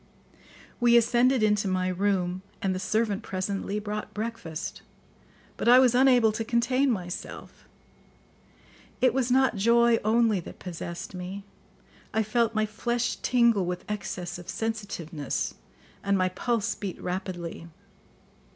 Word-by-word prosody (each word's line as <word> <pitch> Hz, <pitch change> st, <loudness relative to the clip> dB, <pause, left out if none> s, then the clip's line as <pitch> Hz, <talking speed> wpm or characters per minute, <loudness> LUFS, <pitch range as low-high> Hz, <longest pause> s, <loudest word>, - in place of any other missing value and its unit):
We 240 Hz, -1 st, +6 dB
ascended 240 Hz, +1 st, +3 dB
into 210 Hz, -1 st, +2 dB
my 185 Hz, -1 st, 0 dB
room, 185 Hz, -1 st, 0 dB, 0.2 s
and 190 Hz, -1 st, 0 dB
the 185 Hz, -, -3 dB
servant 210 Hz, +1 st, 0 dB
presently 195 Hz, +2 st, -3 dB
brought 210 Hz, 0 st, -5 dB
breakfast; 210 Hz, -8 st, -5 dB, 0.8 s
but -, -, -2 dB
I 245 Hz, -, +9 dB
was 255 Hz, -2 st, +5 dB
unable 250 Hz, -3 st, +5 dB
to 220 Hz, +1 st, -3 dB
contain 245 Hz, +4 st, +2 dB
myself. 180 Hz, -6 st, -5 dB, 1.3 s
It 255 Hz, -2 st, +4 dB
was 260 Hz, -1 st, 0 dB
not 260 Hz, -3 st, +3 dB
joy 235 Hz, +2 st, +4 dB
only 220 Hz, -1 st, +3 dB
that 170 Hz, -, -10 dB
possessed 170 Hz, 0 st, -7 dB
me; 185 Hz, +2 st, -6 dB, 0.7 s
I 220 Hz, -, +3 dB
felt 225 Hz, +1 st, +1 dB
my 215 Hz, 0 st, +2 dB
flesh 235 Hz, +3 st, -2 dB
tingle 235 Hz, -7 st, +3 dB
with 180 Hz, 0 st, -4 dB
excess 180 Hz, -4 st, -4 dB
of 175 Hz, -, -11 dB
sensitiveness, 200 Hz, -9 st, -3 dB, 0.5 s
and 200 Hz, 0 st, +2 dB
my 185 Hz, 0 st, +2 dB
pulse 230 Hz, +3 st, -1 dB
beat 195 Hz, -3 st, -6 dB
rapidly. 180 Hz, -2 st, -5 dB
210 Hz, 130 wpm, -27 LUFS, 185-235 Hz, 1.3 s, I